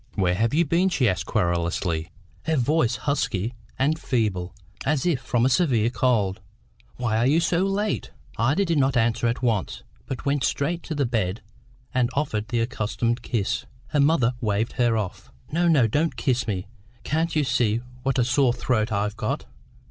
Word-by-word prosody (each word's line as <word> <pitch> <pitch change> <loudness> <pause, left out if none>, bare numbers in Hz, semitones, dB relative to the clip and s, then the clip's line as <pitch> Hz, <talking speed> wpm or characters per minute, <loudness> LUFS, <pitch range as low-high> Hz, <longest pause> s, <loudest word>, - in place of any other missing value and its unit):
"Where 90 -3 +2
have 110 +5 +1
you 170 +2 +4
been?" 170 +5 +2
she 135 -9 +2
asked 90 -4 -1
querulously, 85 -1 0 0.4
her 160 0 +1
voice 130 -2 +2
husky 120 -5 -1 0.2
and 150 +4 +1
feeble, 95 -8 -1 0.3
as 145 +1 0
if 160 -8 +1
from 120 -1 +1
a - - +5
severe 125 -6 +2
cold. 110 -5 +1 0.5
"Why 115 -3 0
are 115 +3 +3
you 150 +4 +4
so 170 0 +1
late?" 205 +2 -1 0.3
Ida 140 - +2
did 165 -4 +1
not 135 -1 +2
answer 120 0 +2
at 120 +2 -2
once, 110 -6 -1 0.2
but 130 - -5
went 140 -1 +1
straight 165 +6 0
to 160 - -4
the 145 -2 +1
bed 110 -4 -1 0.5
and 125 -2 +2
offered 110 -7 -1
the 120 -1 0
accustomed 115 0 -1
kiss. 110 -6 -2 0.2
Her 150 - 0
mother 140 -4 +3
waved 110 0 0
her 120 -2 +2
off. 90 -10 -5 0.2
"No, 170 +3 +2
no; 150 -8 +5
don't 150 +9 0
kiss 130 -2 0
me. 95 -4 -2 0.4
Can't 160 +3 0
you 155 - +3
see 115 -4 +1 0.2
what 135 0 0
a 125 - +4
sore 125 0 +3
throat 115 -3 0
I've 105 +1 -1
got? - - -2
120 Hz, 180 wpm, -24 LUFS, 110-145 Hz, 0.5 s, a